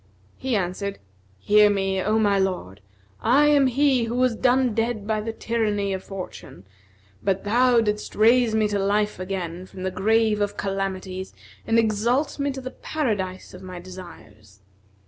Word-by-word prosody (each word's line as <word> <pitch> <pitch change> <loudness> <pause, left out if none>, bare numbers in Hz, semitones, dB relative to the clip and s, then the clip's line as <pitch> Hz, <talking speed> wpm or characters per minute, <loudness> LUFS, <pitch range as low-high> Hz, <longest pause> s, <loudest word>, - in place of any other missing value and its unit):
He 260 -2 -2
answered, 195 +1 -2 0.4
"Hear 210 - +5
me, 195 -1 0
O 215 +3 +1
my 205 -2 +3
lord, 180 - -2 0.4
I 275 +6 +4
am 285 -2 +5
he 260 -1 +2
who 230 +1 -3
was 250 -2 +2
done 250 0 +2
dead 225 -2 -1
by 215 0 -1
the 225 +1 -3
tyranny 210 -3 -1
of 190 - -4
fortune, 110 - -9 0.6
but 195 0 0
thou 240 +3 +4
didst 210 -1 -2
raise 230 +1 +4
me 215 -1 +3
to 205 -1 -1
life 210 +1 0
again 185 -1 -5
from 185 - -9
the 190 - -1
grave 215 +2 +2
of 205 0 -1
calamities 190 - -4 0.3
and 225 - +3
exalt 230 +7 +1
me 280 0 0
to 265 0 -6
the 255 0 -6
paradise 200 -11 -3
of 185 - -11
my 185 -1 -8
desires. 110 - -13
210 Hz, 165 wpm, -24 LUFS, 190-230 Hz, 0.6 s, Hear